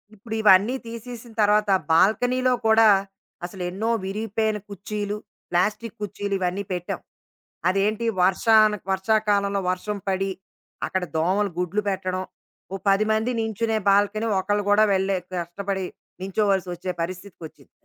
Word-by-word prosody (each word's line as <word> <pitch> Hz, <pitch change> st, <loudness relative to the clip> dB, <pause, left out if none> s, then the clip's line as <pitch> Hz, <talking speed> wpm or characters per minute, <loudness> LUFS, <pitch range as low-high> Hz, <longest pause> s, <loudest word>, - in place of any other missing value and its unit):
ఇప్పుడివన్నీ 215 Hz, +1 st, +3 dB
తీసేసిన 235 Hz, +1 st, -8 dB
తరువాత, 210 Hz, 0 st, +3 dB, 0.2 s
బాల్కనీలో 245 Hz, +9 st, +3 dB
కూడా 220 Hz, 0 st, +6 dB, 0.6 s
అసలెన్నో 185 Hz, +4 st, -3 dB
విరిగిపోయిన 215 Hz, +2 st, -1 dB
కుర్చీలు 205 Hz, +1 st, -4 dB, 0.3 s
ప్లాస్టిక్కు 205 Hz, +5 st, -1 dB
కుర్చీలు 205 Hz, 0 st, -4 dB
ఇవన్నీ 185 Hz, +2 st, -1 dB
పెట్టాం. 180 Hz, -1 st, -3 dB, 0.7 s
అదేంటి 205 Hz, +4 st, 0 dB, 0.2 s
వర్షాను 215 Hz, +3 st, +4 dB
వర్షాకాలంలో 200 Hz, 0 st, +1 dB
వర్షం 195 Hz, +3 st, -2 dB
పడి, 195 Hz, 0 st, 0 dB, 0.5 s
అక్కడ 190 Hz, -1 st, -2 dB
దోమలు 190 Hz, +5 st, +1 dB
గుడ్లు 180 Hz, +3 st, 0 dB
పెట్టడం, 185 Hz, -1 st, -2 dB, 0.5 s
ఓ -, -, -1 dB
10 195 Hz, +2 st, +3 dB
మంది 220 Hz, +3 st, +1 dB
నించునే 225 Hz, 0 st, -1 dB
బాల్కనీ 205 Hz, +3 st, +2 dB
ఒకళ్ళు 205 Hz, +2 st, 0 dB
గూడా 205 Hz, +1 st, +5 dB
వెళ్లే 190 Hz, 0 st, +1 dB, 0.2 s
కష్టపడి 190 Hz, +2 st, -3 dB, 0.4 s
నుంచోవాల్సొచ్చే 190 Hz, -2 st, -1 dB
పరిస్థితికొచ్చింది. 175 Hz, -2 st, -8 dB
200 Hz, 110 wpm, -24 LUFS, 190-215 Hz, 0.7 s, కూడా